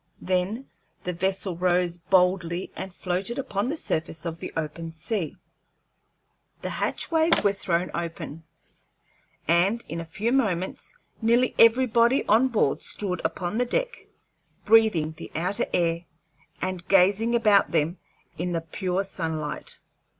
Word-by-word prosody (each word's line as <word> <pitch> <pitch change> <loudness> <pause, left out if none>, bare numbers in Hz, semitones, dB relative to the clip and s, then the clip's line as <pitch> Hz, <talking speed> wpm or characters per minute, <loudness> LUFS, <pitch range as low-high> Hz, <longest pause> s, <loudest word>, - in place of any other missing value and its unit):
Then 190 +8 -1 0.4
the 180 - -2
vessel 190 +1 -1
rose 175 0 +1
boldly 180 0 +1
and 190 - -6
floated 185 +5 -3
upon 210 -4 -2
the 315 - -2
surface 160 - -2
of 165 0 -4
the - - -6
open 165 +1 -4
sea. 170 0 -2 1.3
The - - -2
hatchways 325 0 +2
were 200 -1 +3
thrown 180 -2 -1
open, 165 -2 -5 1.0
and 185 +8 +3
in 165 +2 -4
a - - -7
few 195 +8 -2
moments 195 -9 -1 0.3
nearly 235 +3 +3
everybody 235 +2 +5
on 230 +5 +4
board 215 - +1
stood 190 -3 -2
upon 185 +5 -2
the 245 - +2
upper - - -13
deck, - - -5 0.6
breathing 215 -8 +4
the 165 - -9
outer 180 +5 0
air 170 -1 0 0.6
and 185 -1 -3
gazing 200 +5 +4
about 210 -4 +4
them 165 +2 0 0.4
in 175 +1 -1
the 165 - -1
pure 180 +3 -2
sunlight. 160 -6 -4
185 Hz, 135 wpm, -26 LUFS, 170-220 Hz, 1.3 s, everybody